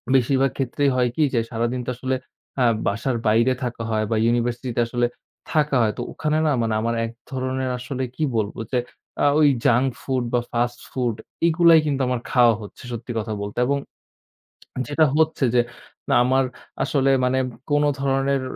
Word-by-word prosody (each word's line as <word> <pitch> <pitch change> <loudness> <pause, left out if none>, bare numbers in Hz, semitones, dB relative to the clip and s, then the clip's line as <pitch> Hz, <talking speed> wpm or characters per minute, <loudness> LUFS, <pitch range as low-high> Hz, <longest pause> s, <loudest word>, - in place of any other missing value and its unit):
বেশিরভাগ 135 +1 +3
ক্ষেত্রেই 140 +2 +1
হয় 125 -1 +2
কি, 155 - +2
যে 120 - +3
সারাদিন 120 +2 -1
তো - - -4
আসলে 130 +1 -2 0.5
আ - - +5 0.2
বাসার 115 +5 -1
বাইরে 115 +4 +4
থাকা 120 -2 -4
হয় 110 0 +1
বা - - +2
ইউনিভার্সিটি 120 +1 0
তে 120 - +2
আসলে 120 0 0 0.5
থাকা 150 -2 +2
হয়। 110 - +2
তো - - -3
ওখানে 155 0 0
না - - +3
মানে 115 -1 0
আমার 115 +1 0
এক 115 - -6 0.2
ধরনের 130 0 -2
আসলে 130 +1 -4
কি 155 - -2
বলব, 105 -2 -1 0.2
যে 125 - +1 0.5
আ - - +4
ওই 150 - +6 0.2
জাঙ্ক 125 +3 +4
ফুড 130 -2 -1
বা 120 - +4
ফাস্ট 120 0 -1
ফুড 120 -4 -1 0.3
এগুলাই 165 0 +6
কিন্তু 140 -2 0
আমার 125 -1 0
খাওয়া 120 -2 +5
হচ্ছে 105 +6 -11
সত্যি 120 +1 -6
কথা 110 0 -3
বলতে। 100 +2 -6
এবং 140 - +2 1.1
যেটা 150 +2 +3
হচ্ছে 160 -3 +2
যে 120 - +5 0.5
না - - +3
আমার 130 +1 +3 0.4
আসলে 135 -2 +2
মানে 130 +1 +2 0.3
কোন 145 0 +3 0.2
ধরনের 135 0 +1
130 Hz, 180 wpm, -23 LUFS, 120-135 Hz, 1.1 s, ওই